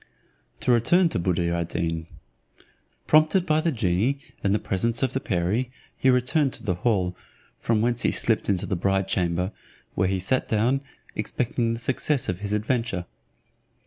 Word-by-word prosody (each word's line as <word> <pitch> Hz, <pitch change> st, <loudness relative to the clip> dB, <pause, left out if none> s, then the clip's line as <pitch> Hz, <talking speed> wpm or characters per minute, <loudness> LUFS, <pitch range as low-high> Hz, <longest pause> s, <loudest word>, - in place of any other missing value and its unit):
To -, -, +2 dB
return 165 Hz, +10 st, +4 dB
to 95 Hz, -, -2 dB
Buddir 85 Hz, -1 st, 0 dB
ad 85 Hz, -1 st, -1 dB
Deen. 80 Hz, -1 st, -2 dB, 1.0 s
Prompted 155 Hz, +4 st, +4 dB
by 155 Hz, -1 st, +2 dB
the 165 Hz, -, +1 dB
genie 110 Hz, -, +1 dB, 0.3 s
and 100 Hz, -, +2 dB
the 105 Hz, -, +3 dB
presence 115 Hz, +5 st, -1 dB
of 130 Hz, -1 st, 0 dB
the 135 Hz, -, 0 dB
perie, 105 Hz, +5 st, -1 dB, 0.3 s
he 130 Hz, -, +2 dB
returned 130 Hz, +3 st, +2 dB
to -, -, -6 dB
the 100 Hz, -5 st, 0 dB
hall, 90 Hz, -2 st, 0 dB, 0.4 s
from 115 Hz, -2 st, +1 dB
whence 120 Hz, 0 st, +1 dB
he -, -, +3 dB
slips 115 Hz, -3 st, +1 dB
into 95 Hz, -3 st, +1 dB
the 95 Hz, -, -1 dB
bride 95 Hz, +2 st, 0 dB
chamber, 90 Hz, 0 st, 0 dB, 0.4 s
where 95 Hz, -, +1 dB
he 95 Hz, 0 st, 0 dB
sat 130 Hz, +8 st, 0 dB
down, 120 Hz, +5 st, +1 dB, 0.3 s
expecting 115 Hz, -1 st, -1 dB
the -, -, -7 dB
success 130 Hz, +2 st, 0 dB
of 90 Hz, -1 st, -2 dB
his 100 Hz, 0 st, -4 dB
adventure. 105 Hz, -3 st, -1 dB
110 Hz, 170 wpm, -25 LUFS, 90-125 Hz, 1.0 s, return